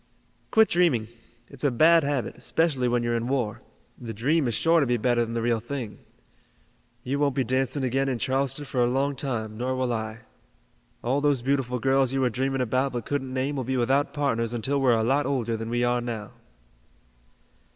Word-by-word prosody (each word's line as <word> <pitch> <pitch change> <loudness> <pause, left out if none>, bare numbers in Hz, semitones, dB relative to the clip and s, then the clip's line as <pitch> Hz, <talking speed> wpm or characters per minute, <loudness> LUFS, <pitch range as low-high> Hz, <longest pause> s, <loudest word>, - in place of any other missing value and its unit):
"Quit 220 -1 +5
dreaming. 140 -11 +2 0.4
It's 140 -1 -7
a 145 - +4
bad 160 +6 +5
habit, 140 -3 -2
especially 150 -7 0
when 120 0 +1
you're 120 0 0
in 115 0 -1
war. 125 -6 -1 0.4
The 115 -3 -7
dream 140 +6 +1
is 115 - -1
sure 165 +6 +3
to 140 - +1
be 120 0 +1
better 120 +1 +2
than 115 0 -5
the 115 - -1
real 115 -1 +1
thing. 120 -2 -6 1.0
You 140 +3 -2
won't 140 -3 +1
be 135 - +1
dancing 130 +3 0
again 135 +2 0
in 130 - -1
Charleston 135 +3 -1
for 130 -2 -1
a 120 - +2
long 135 +2 0
time, 110 -5 -3
nor 130 +1 -1
will 130 -1 -1
I. 110 0 -4 0.8
All 130 +4 +1
those 140 -4 +1
beautiful 130 -2 0
girls 135 +1 +2
you 135 - 0
were 125 -2 +2
dreaming 135 +2 -1
about 130 +3 0
but 120 -2 -4
couldn't 135 -2 -3
name 135 +3 -1
will 135 - -2
be 130 +2 -2
without 135 +4 +1
partners 120 -5 -1
until 135 +5 -1
we're 130 -3 +4
a 110 - +1
lot 135 +4 +1
older 120 -5 -1
than 115 0 -5
we 120 +1 0
are 120 0 +1
now." 115 -4 -5
130 Hz, 205 wpm, -26 LUFS, 120-140 Hz, 1.0 s, Quit